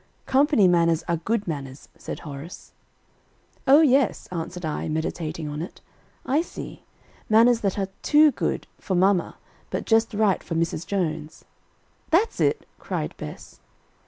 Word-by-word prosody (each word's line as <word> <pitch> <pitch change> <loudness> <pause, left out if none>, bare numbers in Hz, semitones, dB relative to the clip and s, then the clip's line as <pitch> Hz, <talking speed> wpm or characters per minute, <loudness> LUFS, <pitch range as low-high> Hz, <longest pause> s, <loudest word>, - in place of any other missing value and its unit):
"Company 270 -6 +4
manners 170 -2 +3
are 170 -1 +1
good 210 +5 -2
manners;" 140 -4 -6
said - - -7
Horace. 150 +2 -9 0.9
"O 280 +4 +8
yes," 270 -5 +3
answered 175 0 -5
I, 155 +1 -3
meditating 160 0 -3
on 150 +1 -4
it. 175 - -8 0.5
"I 285 +5 +2
see; 345 - -9 0.4
manners 230 +2 +5
that 195 -1 -1
are 195 -1 -1
too 300 0 +5
good - - -2
for 190 - -2
mamma 185 0 +2 0.3
but - - -3
just 225 -1 +2
right 205 -3 +2
for 165 - -5
Mrs. 165 0 -1
Jones." 160 -5 -3 0.6
"That's 385 +8 +2
it," - - +1
cried - - -3
Bess. - - -9
185 Hz, 140 wpm, -24 LUFS, 160-230 Hz, 0.9 s, O